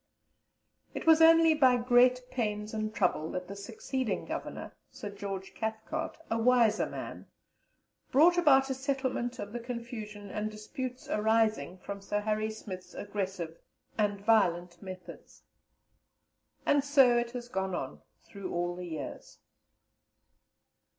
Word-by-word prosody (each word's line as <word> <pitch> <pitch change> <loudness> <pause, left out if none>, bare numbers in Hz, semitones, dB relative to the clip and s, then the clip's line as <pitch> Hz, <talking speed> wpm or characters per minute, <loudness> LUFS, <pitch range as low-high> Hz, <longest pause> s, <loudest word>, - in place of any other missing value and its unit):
It - - -4
was 325 0 +7
only 325 0 +7
by 260 -5 +5
great 250 +1 +4
pains 210 -3 -2
and 215 0 -2
trouble 160 -7 0
that 180 0 -4
the 200 - -7
succeeding 220 +1 -3
Governor, - - -5 0.2
Sir 205 - -7
George 195 -1 -6
Cathcart, 220 +9 -4
a 225 - -1
wiser 235 -2 +4
man, - - -7 0.8
brought 325 +6 +6
about 270 -6 +5
a - - +2
settlement 260 -2 -2
of 205 -2 -6
the 240 - -3
confusion 230 -4 -7
and 215 0 -2
disputes 250 +4 -6
arising 215 -6 +1
from 200 +2 -7
Sir 205 +1 -1
Harry 215 +1 0
Smith's 190 -4 -8
aggressive 190 -5 -4 0.4
and 205 -2 0
violent 180 -5 +2
methods. 185 -3 -10 1.2
And 285 -1 +4
so 275 -4 +5
it 240 0 -2
has 245 -1 -5
gone 190 -5 -2
on, 135 - -5 0.2
through 200 -2 -7
all 175 0 -1
the 180 0 -6
years. 155 -5 -7
215 Hz, 130 wpm, -30 LUFS, 195-250 Hz, 1.2 s, was